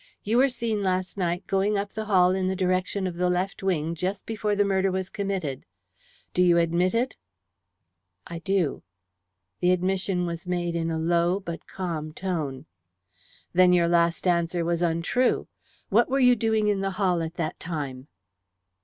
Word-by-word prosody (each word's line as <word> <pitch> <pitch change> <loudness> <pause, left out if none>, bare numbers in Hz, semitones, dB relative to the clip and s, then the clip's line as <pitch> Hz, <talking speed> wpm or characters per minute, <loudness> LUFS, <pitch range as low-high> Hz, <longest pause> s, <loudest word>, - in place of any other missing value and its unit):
You 220 +3 +1
were 275 +1 +5
seen 230 -4 -2
last 185 -1 -1
night 175 -2 -1
going 200 +2 +1
up 200 0 -3
the 220 -1 -4
hall 185 -3 +4
in 185 0 0
the 190 - 0
direction 185 +1 0
of 175 -2 -4
the 180 0 +1
left 180 +2 -1
wing 170 -4 0
just 185 +4 -3
before 210 -2 -1
the 205 0 +3
murder 195 -1 +1
was 190 +1 -3
committed. 190 -10 -3 0.7
Do 180 - +2
you 175 -1 +5
admit 170 +4 +2
it?" 250 +3 0 1.1
"I 170 -1 -7
do." 175 -3 0 0.8
The 180 - +2
admission 185 0 +1
was 170 +1 -5
made 175 -1 -1
in 165 0 -1
a 160 - -1
low 170 +3 +2
but 170 -4 -7
calm 160 -5 -4
tone. 155 -7 -3 0.9
"Then 180 0 +5
your 170 -1 +4
last 170 0 +2
answer 170 -1 +1
was 170 0 0
untrue. 170 +9 +1 0.4
What - - +3
were 270 - +1
you 250 -1 +6
doing 220 -1 +1
in 205 -2 +1
the 195 - 0
hall 180 -4 +2
at 165 +1 -4
that 160 -2 -3
time?" 140 -5 -5
180 Hz, 170 wpm, -26 LUFS, 170-195 Hz, 1.1 s, you